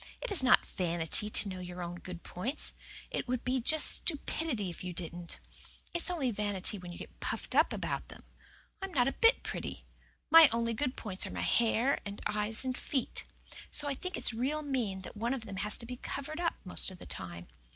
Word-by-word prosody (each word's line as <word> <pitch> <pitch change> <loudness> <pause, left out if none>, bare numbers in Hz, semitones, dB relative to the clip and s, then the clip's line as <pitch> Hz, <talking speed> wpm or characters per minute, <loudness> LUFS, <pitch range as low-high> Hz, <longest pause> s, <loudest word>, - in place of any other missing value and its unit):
"It - - -5
is 390 - +6
not 255 -1 +5
vanity 175 +3 +1
to 215 - +2
know 185 -1 -5
your 180 0 -6
own 175 0 -5
good 180 -1 -8
points. 240 - 0 0.4
It - - -2
would 250 -1 -2 0.2
just 310 +4 +5
be 340 - +4
stupidity 280 -9 -2
if 170 - -9
you 180 -1 -4
didn't. 170 0 -6 0.5
It's 345 +1 +3
only 295 -9 0
vanity 205 -1 +1
when 180 -1 -8
you 175 - -8
get - - -11
puffed - - -3
up - - +5
about - - -3
them. - - -12 0.6
I 385 - -2
am 375 - -14
not 245 -2 +4
a - - +2
bit 460 +1 +4
pretty. - - -5 0.5
My 325 -1 +10
only 230 0 0
good 255 +3 -1
points 190 -3 -2
are - - -7
my - - -4
hair 235 +3 +2
and 200 0 -6
eyes 210 +3 0
and 255 -1 -1
feet. 265 -1 -2 0.4
So 290 - +3
I 285 - 0
think 365 +7 -5
it's - - 0
real 275 +7 -1
mean 235 -9 -1
that - - -9
one 235 +5 0
of 235 -4 -7
them 195 -3 -7
has 210 +2 +1
to 235 - -9
be 250 +1 -6
covered 310 +6 -5
up 340 -1 0
the 185 - -9
most - - -1
of 185 - -10
the - - -11
time. 85 -2 -7
225 Hz, 220 wpm, -32 LUFS, 185-275 Hz, 0.6 s, My